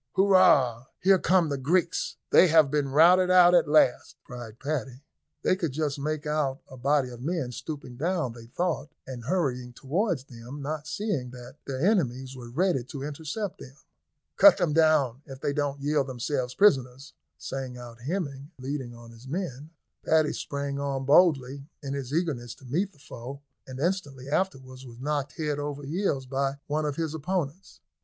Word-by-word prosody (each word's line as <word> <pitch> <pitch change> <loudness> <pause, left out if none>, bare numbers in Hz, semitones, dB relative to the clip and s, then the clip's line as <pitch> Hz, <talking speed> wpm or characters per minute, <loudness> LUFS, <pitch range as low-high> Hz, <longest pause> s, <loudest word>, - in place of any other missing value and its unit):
"Hurrah! 145 - +4
here 190 0 +5
come 180 -3 +3
the 140 -1 -2
Greeks, 170 +5 0 0.2
they 185 - +7
have 160 -4 +5
been 145 -2 0
routed 175 +6 +6
out 180 -1 +7
at 175 - +5
last," 150 -4 +3
cried 120 -3 -9
Paddy. 135 -2 -4 0.4
They - - +3
could 165 -7 -3
just 145 -1 -2
make 150 +1 -3
out 150 -3 0
a 130 - -11
body 135 +1 +1
of 120 -1 -10
men 150 -3 -2
stooping 135 -2 -7
down, 165 -4 -1
they 115 -1 -12
thought, 170 +3 -2 0.2
and 125 -3 -8
hurrying 125 -7 -1
towards 160 - -1
them, 125 +2 -10
not 150 +1 -4
seeing 150 - -2
that 125 +2 -11
their 135 +3 -1
enemies 135 - +1
were 120 -2 -9
ready 160 0 +1
to 140 0 -7
intercept 160 +7 -5
them. 135 0 -12 0.6
"Cut 300 - +8
them 175 -5 +1
down, 150 -6 +3
if 135 -2 -9
they 140 - -1
don't 145 -1 -1
yield 145 -1 +1
themselves 130 0 -3
prisoners," 135 -9 +2 0.2
sang 130 -2 -5
out 120 -1 -11
Hemming, 140 -2 -4
leading 130 -2 -5
on 115 0 -13
his 115 +3 -14
men. 150 -3 -4 0.3
Paddy 155 -1 +3
sprang 140 -1 -4
on 135 -1 -2
boldly, 140 -3 +3 0.2
in 140 -1 -4
his 135 -2 -5
eagerness 140 -8 -2
to 135 - -17
meet 175 +11 -1
the 175 - -25
foe, 135 -1 -9 0.3
and 130 0 -8
instantly 145 -6 -2
afterwards 135 -6 -2
was 120 -2 -12
knocked 145 0 -2
head 150 -2 -2
over 145 0 -4
heels 145 -3 -1
by 135 +1 -1
one 150 +1 -1
of 145 - -2
his 160 -1 -2
opponents. 160 +1 -4
140 Hz, 175 wpm, -27 LUFS, 130-160 Hz, 0.6 s, Cut